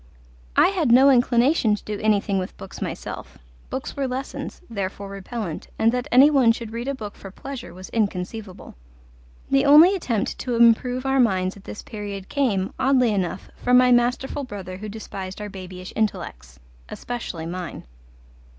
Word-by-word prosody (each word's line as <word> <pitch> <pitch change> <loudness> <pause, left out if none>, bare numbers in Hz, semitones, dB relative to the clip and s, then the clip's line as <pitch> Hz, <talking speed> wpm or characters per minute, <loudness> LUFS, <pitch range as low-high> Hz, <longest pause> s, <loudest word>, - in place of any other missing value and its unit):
I - - +6
had 340 -10 +1
no 265 +3 +7
inclination 245 -1 +3
to - - -11
do 210 -1 -4
anything 205 -2 +1
with 185 - -6
books - - -10
myself: - - -6 0.3
books - - -5
were 275 -1 -1
lessons, 265 +2 -5
therefore 200 -2 -5
repellent, 195 -2 -6
and 225 +1 +3
that 250 +2 -2
any 270 +5 +7
one 260 -5 +5
should 230 -1 -7
read 235 +2 -4
a 275 - -1
book 210 -5 -7
for 195 - -11
pleasure 255 +2 -8
was 185 +2 -10
inconceivable. 200 -1 -3 0.8
The 275 0 +4
only 305 +6 +8
attempt 240 - -2
to 245 -2 -2
improve 240 +2 +3
our 270 0 +2
minds 190 -6 +2
at 200 - -15
this - - -8
period 200 -2 -7
came, 210 -10 0
oddly 255 -3 +3
enough, 185 -1 -3
from 250 0 +4
my 250 0 +5
masterful 245 +3 +1
brother 195 -7 -7
who 210 +2 -7
despised 195 -3 -7
our 210 0 -5
babyish 185 -1 -9
intellects 65 - -3 0.3
especially 225 -9 -5
mine. 175 0 -6
225 Hz, 165 wpm, -23 LUFS, 195-255 Hz, 0.8 s, only